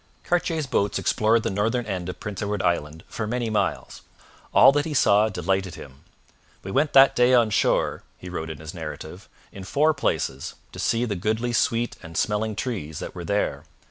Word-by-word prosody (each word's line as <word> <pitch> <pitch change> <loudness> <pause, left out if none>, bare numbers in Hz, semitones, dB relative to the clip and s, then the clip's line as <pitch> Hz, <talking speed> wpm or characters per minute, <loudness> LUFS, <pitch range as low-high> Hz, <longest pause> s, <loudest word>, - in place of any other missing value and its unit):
Cartier's 165 -3 0
boats 100 -6 0
explored 110 +1 +2
the - - -1
northern 115 +5 0
end 90 -4 -4
of 90 - -7
prince 105 -3 -6
Edward 105 -1 -2
Island 80 -2 -1
for 110 - -4
many 120 0 -2
miles. 105 - -2 0.5
All - - +7
that 145 +1 +1
he 155 -2 -4
saw 105 -3 +4
delighted 95 -1 -1
him. 65 -1 -12 0.6
'We 95 - -6
went 150 +9 +1
that 135 0 +7
day 125 +1 +5
on 115 -3 +3
shore,' - - +1 0.2
he 90 - -11
wrote 80 -3 -5
in 80 - -6
his 80 0 -9
narrative, 80 +3 -8 0.2
'in 95 - -9
four 150 +11 +2
places, 70 - -2 0.2
to - - -10
see 115 +1 +1
the 105 -4 -2
goodly 110 +6 -1
sweet 115 +1 0
and 80 -2 -9
smelling 110 0 0
trees 100 - -4
that - - -6
were 85 - -7
there. 100 +4 -1
105 Hz, 190 wpm, -24 LUFS, 90-120 Hz, 0.6 s, All